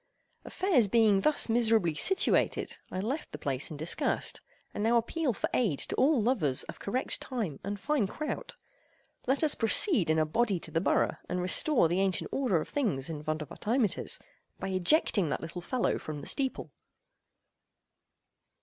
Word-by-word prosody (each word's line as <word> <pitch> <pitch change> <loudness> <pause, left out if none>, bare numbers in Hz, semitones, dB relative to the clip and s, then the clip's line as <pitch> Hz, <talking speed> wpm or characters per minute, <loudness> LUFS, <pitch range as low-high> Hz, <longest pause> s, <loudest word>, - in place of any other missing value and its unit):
Affairs 350 - +2
being 210 -2 +3
thus 305 +4 +3
miserably 225 -7 +2
situated, 380 - +1
I 185 - -4
left 265 +9 -4
the - - -6
place 140 -1 -2
in 155 - -7
disgust, 160 +3 -1 0.3
and 205 - -3
now 235 +2 +3
appeal 275 +5 -1
for 215 - -3
aid 200 - +1
to - - -2
all 280 0 +3
lovers 205 - +1
of - - -10
correct 250 +6 -1
time 215 - -4
and 200 0 -4
fine 280 -4 0
kraut. 300 +9 -5 0.7
Let 270 +4 +1
us 305 - +4
proceed 225 - +2
in 160 - +2
a 155 - +2
body 205 +3 0
to - - -3
the 165 - 0
borough, - - +1
and 180 - -2
restore 185 - +4
the 175 +3 -1
ancient 190 -2 0
order 245 -11 +1
of - - -6
things 175 - -1
in 150 -2 -6
Vondervotteimittiss 160 - -2 0.4
by - - -4
ejecting 190 - +2
that - - -2
little 170 +2 -7
fellow 250 +7 -1
from 150 -2 -7
the - - -9
steeple. 270 -2 -2
205 Hz, 165 wpm, -29 LUFS, 165-255 Hz, 0.7 s, us